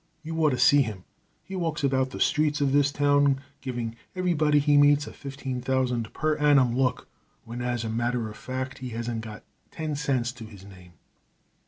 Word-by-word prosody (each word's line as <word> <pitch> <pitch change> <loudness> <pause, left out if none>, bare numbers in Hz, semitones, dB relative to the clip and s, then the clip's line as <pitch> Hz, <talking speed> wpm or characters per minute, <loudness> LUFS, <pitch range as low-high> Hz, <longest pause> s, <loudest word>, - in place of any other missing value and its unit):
You 160 +1 -5
ought 155 - +5
to 130 - -1
see 145 +3 +6
him. 105 -8 -4 0.4
He 190 - -8
walks 165 -5 -2
about 130 -1 +1
the - - -8
streets 150 0 +2
of 140 -2 +1
this 145 0 +3
town 145 -1 +3 0.2
giving 120 -3 -4 0.2
everybody 160 -5 +2
he 145 0 +3
meets 145 0 +5
a - - -9
fifteen 135 -2 -6
thousand 125 -3 -1
per 155 0 -1
annum 140 -5 +4
look 125 -2 0 0.4
when, 120 +2 -6
as 120 -1 -2
a 110 - -3
matter 120 0 -1
of 105 - -9
fact, 130 0 -5
he 130 -1 -6
hasn't 115 -1 -3
got 110 -1 -9 0.3
ten 155 -2 -4
cents 135 -4 0
to 120 -2 -10
his 100 -3 -13
name. 90 -3 -15
130 Hz, 190 wpm, -26 LUFS, 120-145 Hz, 0.4 s, see